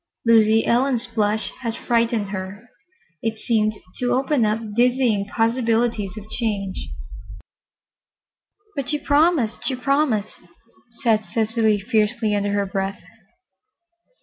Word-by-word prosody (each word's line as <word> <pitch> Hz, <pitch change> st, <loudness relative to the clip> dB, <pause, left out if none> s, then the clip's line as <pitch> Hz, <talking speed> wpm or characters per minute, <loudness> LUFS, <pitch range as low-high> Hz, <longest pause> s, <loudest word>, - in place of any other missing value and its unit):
Lucy 225 Hz, -1 st, +5 dB
Ellen's 245 Hz, 0 st, +2 dB
blush 220 Hz, -2 st, -1 dB
had 230 Hz, -3 st, -3 dB
frightened 230 Hz, -3 st, 0 dB
her. 200 Hz, +4 st, -7 dB, 0.5 s
It 225 Hz, -1 st, -2 dB
seemed 215 Hz, -1 st, +1 dB, 0.3 s
to 245 Hz, -, +1 dB
open 265 Hz, -3 st, +2 dB
up 215 Hz, 0 st, -2 dB
dizzying 240 Hz, -4 st, +2 dB
possibilities 225 Hz, -2 st, 0 dB
of 215 Hz, 0 st, -9 dB
change. 210 Hz, -4 st, -2 dB, 1.9 s
"But 280 Hz, -3 st, -3 dB
she 300 Hz, -, +1 dB
promised—she 285 Hz, -4 st, +1 dB
promised," 255 Hz, -5 st, 0 dB, 0.6 s
said 220 Hz, -3 st, +2 dB
Cecily 220 Hz, +2 st, +1 dB
fiercely, 220 Hz, 0 st, 0 dB
under 205 Hz, 0 st, 0 dB
her 200 Hz, -1 st, +1 dB
breath. 195 Hz, -1 st, -3 dB
225 Hz, 105 wpm, -22 LUFS, 210-245 Hz, 1.9 s, Lucy